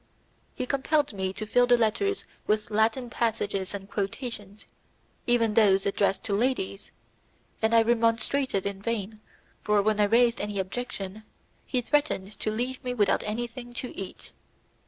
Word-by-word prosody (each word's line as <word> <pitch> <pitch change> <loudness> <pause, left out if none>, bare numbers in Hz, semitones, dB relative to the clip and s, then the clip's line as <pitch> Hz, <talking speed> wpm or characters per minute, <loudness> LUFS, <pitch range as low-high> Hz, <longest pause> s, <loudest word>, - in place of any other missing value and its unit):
He 255 - -2
compelled 285 +1 +1
me 190 -1 -2
to 215 - -4
fill 245 +3 +3
the 245 0 +6
letters 235 - 0 0.2
with 215 0 0
Latin 225 +3 +1
passages 205 -5 -1
and 195 -1 -7
quotations, 205 0 -4 0.6
even 230 -3 +3
those 195 -3 +4
addressed 195 -1 +1
to 205 - -2
ladies, 205 -3 -1 0.7
and 220 +1 +3
I 230 - +7
remonstrated 230 0 +1
in 200 -1 -3
vain, 215 -1 -3 0.4
for, 210 -1 +2
when 215 0 +1
I 210 - +5
raised 235 +2 +3
any 205 0 -3
objection, 195 0 -4 0.5
he 250 - 0
threatened 240 -7 0
to - - -1
leave 245 +4 -3
me 250 -1 -2
without 205 -4 +3
anything 240 +3 -5
to 250 - -5
eat. 195 - -7
220 Hz, 150 wpm, -27 LUFS, 200-245 Hz, 0.7 s, I